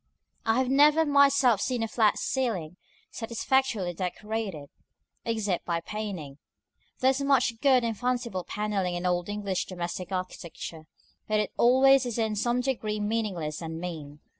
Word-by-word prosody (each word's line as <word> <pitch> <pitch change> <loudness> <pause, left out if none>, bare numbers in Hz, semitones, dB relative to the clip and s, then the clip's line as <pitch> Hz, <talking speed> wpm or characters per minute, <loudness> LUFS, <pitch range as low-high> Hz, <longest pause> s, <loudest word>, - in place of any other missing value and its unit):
I 225 +1 +3
have 260 0 +2
never 300 +4 +5
myself 280 -6 +4
seen 250 -3 -1
a - - -1
flat 220 -2 +2
ceiling 195 - -2 0.4
satisfactorily 230 -4 0
decorated, 190 -3 -4 0.6
except 215 -6 -1
by 170 -1 -1
painting: 175 -8 -6 0.6
there 260 +1 +5
is 270 +1 -2
much 260 -4 +2
good 260 -3 +4
and 230 -1 -1
fanciful 240 -5 -2
panelling 200 -4 -2
in 175 +1 -4
old 175 +1 0
English 200 -3 -2
domestic 180 0 -5
architecture, 170 -3 -6 0.4
but 215 0 +1
it 210 - -1
always 260 +1 +5
is 240 - -3
in 220 -2 0
some 240 +4 +1
degree 220 -5 -2
meaningless 205 -8 -2
and 160 0 -5
mean. 155 -4 -7
215 Hz, 145 wpm, -28 LUFS, 180-250 Hz, 0.6 s, never